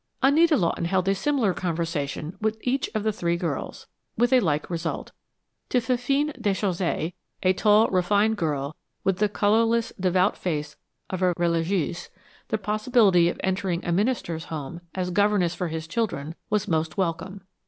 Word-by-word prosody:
Anita 305 +3 +5
Lawton 170 -2 0
held 185 +1 +1
a 195 - +4
similar 225 -1 +1
conversation 165 -3 -3
with 220 0 0
each 260 +2 0
of 215 - 0
the 220 - +2
three 170 -2 0
girls, 170 -6 -4 0.3
with 240 +3 +3
a 255 - +7
like 155 -8 0
result. 165 -1 -4 0.6
To 250 - +3
Fifine 270 +4 0
Déchaussée, 185 -4 0 0.3
a 185 0 +4
tall, 210 +3 +4
refined 205 +4 +2
girl, 150 -5 -2 0.3
with 190 -1 +1
the 210 0 +3
colorless, 225 +3 +2
devout 185 +1 +2
face 150 -4 -3 0.4
of 185 -1 -3
a 180 -1 +3
religieuse, 170 0 0 0.4
the - - 0
probability 210 -4 +3
of - - -5
entering 185 -2 -1
a 175 - 0
minister's 175 -5 0
home, 160 +2 -6
as 180 -1 -2
governess 200 -3 +2
for 180 - -3
his 160 0 -4
children, 165 -5 -2 0.2
was 210 -2 0
most 160 -1 -1
welcome. 190 +2 -2
185 Hz, 155 wpm, -25 LUFS, 170-215 Hz, 0.6 s, a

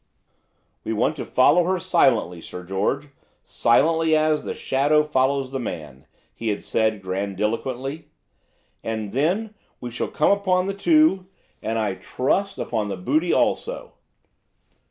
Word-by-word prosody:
"We 110 - -2
want 115 +8 +1
to - - -4
follow 150 +7 +4
her 185 +1 +1
silently, 95 - +2
Sir 90 - -8
George, 100 +11 -2 0.4
silently 160 +6 +3
as, 155 0 +1
the - - -4
shadow 145 +3 +2
follows 135 -2 0
the 135 - -3
man," 75 - -7 0.3
he 115 - -6
had 105 -2 -1
said 110 -3 0
grandiloquently, 115 - -3 0.8
"and 110 -2 -3
then 180 - 0 0.3
we 120 - -6
shall 120 - -3
come 150 - +2
upon 185 -2 +2
the 195 - -2
two, 255 - +3 0.3
and 110 +1 -2
I 105 -3 0
trust 140 - -1
upon 110 -3 -2
their 100 - -4
booty 295 - 0
also." - - 0
135 Hz, 135 wpm, -23 LUFS, 110-165 Hz, 0.8 s, follow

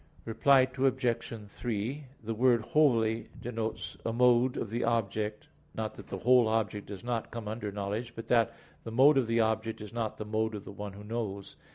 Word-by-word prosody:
Reply 130 +4 +5
Obj. 125 -3 0
3: 120 +6 -3 0.2
The 115 +1 -2
word 120 0 +4
"wholly" 115 -6 +2
denotes 115 -2 -4
a 115 - -1
mode 125 +1 +4
of 110 - -3
the 120 +2 -1
object; 110 -2 -1 0.3
not - - -3
that - - -12
the - - -5
whole 125 -1 +5
object 105 -2 -1
does 100 0 -8
not 120 -2 -2
come 115 -2 -6
under 105 -1 -4
knowledge, 105 +4 -4
but 115 0 -7
that 115 -3 +3 0.3
the - - -6
mode 135 +4 +6
of 125 - 0
the 115 0 +3
object 110 0 0
is 105 -1 -9
not 115 -2 -2
the 105 - -5
mode 110 +1 -1
of 100 - -7
the - - -8
one 100 0 -7
who 100 +1 -10
knows. 105 -3 -4
115 Hz, 195 wpm, -30 LUFS, 105-120 Hz, 0.3 s, mode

